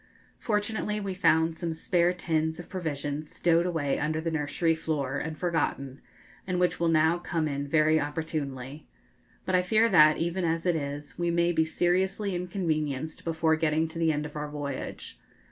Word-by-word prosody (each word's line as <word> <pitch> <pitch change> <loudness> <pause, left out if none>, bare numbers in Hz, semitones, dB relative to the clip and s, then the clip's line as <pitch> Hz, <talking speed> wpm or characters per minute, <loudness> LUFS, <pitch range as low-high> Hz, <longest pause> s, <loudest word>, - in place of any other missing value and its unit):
Fortunately, 210 -1 -1
we 200 -2 -3
found 160 -2 +2
some 170 -2 -2
spare 175 +2 +2
tins 160 -2 -1
of 175 - -9
provisions 150 -4 -4
stowed 170 0 +3
away 155 -6 -1
under 155 +1 -1
the 165 +1 -2
nursery 160 +2 0
floor 145 -4 -2
and 155 -1 -5
forgotten, 145 -6 -2 0.5
and 180 -1 0
which 180 0 +1
will 170 - +2
now 160 +1 +3
come 165 -2 -1
in 140 -1 -3
very 155 +1 +3
opportunely. 145 -2 -4 0.6
But 185 - -2
I 180 - +5
fear 220 +5 +3
that, 155 -5 +6
even 170 +2 -1
as 165 0 0
it 175 -2 +2
is, 145 0 -5
we 175 0 +1
may 170 0 +2
be 160 -1 +2
seriously 190 +4 0
inconvenienced 160 -5 -2
before 160 -1 +1
getting 160 0 +1
to 165 - -7
the 165 -1 +3
end 150 0 -2
of 150 - -9
our 150 0 -4
voyage. 145 -2 -6
160 Hz, 175 wpm, -28 LUFS, 150-175 Hz, 0.6 s, that